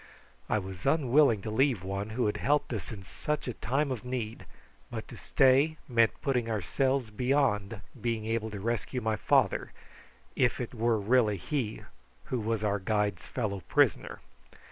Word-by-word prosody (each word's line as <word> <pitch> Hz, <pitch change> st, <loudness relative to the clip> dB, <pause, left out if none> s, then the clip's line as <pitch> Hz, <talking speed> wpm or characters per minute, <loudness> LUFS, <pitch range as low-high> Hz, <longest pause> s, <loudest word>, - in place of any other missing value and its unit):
I -, -, +2 dB
was 95 Hz, -3 st, -5 dB
unwilling 135 Hz, -7 st, +4 dB
to 110 Hz, -, -4 dB
leave 125 Hz, -4 st, +2 dB
one 100 Hz, +2 st, -3 dB
who 120 Hz, +3 st, -1 dB
had 105 Hz, -, 0 dB
helped 145 Hz, -2 st, +1 dB
us 105 Hz, -7 st, -5 dB
in 100 Hz, -4 st, -8 dB
such 150 Hz, +10 st, -3 dB
a 125 Hz, -, -2 dB
time 135 Hz, +5 st, -1 dB
of 120 Hz, -5 st, -4 dB
need; 125 Hz, -3 st, -4 dB, 0.4 s
but -, -, -6 dB
to -, -, -9 dB
stay 135 Hz, +4 st, +3 dB
meant 115 Hz, -3 st, +2 dB
putting 125 Hz, -4 st, 0 dB
ourselves 125 Hz, -, 0 dB
beyond 115 Hz, -4 st, +1 dB, 0.2 s
being 115 Hz, -2 st, -1 dB
able 110 Hz, 0 st, -1 dB
to 105 Hz, -2 st, -6 dB
rescue 115 Hz, +4 st, -2 dB
my 110 Hz, -2 st, 0 dB
father, -, -, +2 dB, 0.6 s
if 125 Hz, -2 st, +2 dB
it 120 Hz, -1 st, -4 dB
were 115 Hz, -1 st, +1 dB
really 110 Hz, -1 st, +3 dB
he 115 Hz, -, -3 dB, 0.4 s
who 125 Hz, -, -2 dB
was 110 Hz, 0 st, -1 dB
our 105 Hz, -1 st, +1 dB
guide's 105 Hz, -1 st, -1 dB
fellow 105 Hz, -6 st, -2 dB
prisoner. -, -, +2 dB
115 Hz, 165 wpm, -30 LUFS, 105-130 Hz, 0.6 s, unwilling